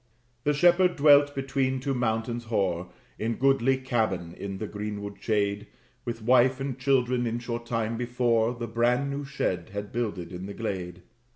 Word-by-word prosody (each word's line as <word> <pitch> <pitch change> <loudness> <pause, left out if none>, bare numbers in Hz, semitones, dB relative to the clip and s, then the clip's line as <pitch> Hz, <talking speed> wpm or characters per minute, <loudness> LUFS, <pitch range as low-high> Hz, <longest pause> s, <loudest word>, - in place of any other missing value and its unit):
The 150 - +3
shepherd 175 +3 +4
dwelt 145 0 +6
between 135 -1 0
two 135 +1 -1
mountains 120 -1 -1
hoar, 90 -5 -1 0.3
In 115 +1 -1
goodly 135 0 +3
cabin, 110 -10 -1
in 95 +1 -6
the 110 - -4
greenwood 105 -1 -5
shade, 105 -1 0 0.4
With 115 -2 -4
wife 125 +2 +4
and 135 -1 -3
children; 125 -2 +2
in 115 +1 -1
short 120 0 -5
time 115 -1 -1
before, 120 -1 +1
The 120 0 -4
brand 120 +5 +1
new 140 +1 -3
shed 95 -10 -2
had 100 0 -5
builded 105 -7 -3
in 90 +1 -6
the 100 - -7
glade. 90 -5 -4
120 Hz, 165 wpm, -27 LUFS, 105-130 Hz, 0.4 s, dwelt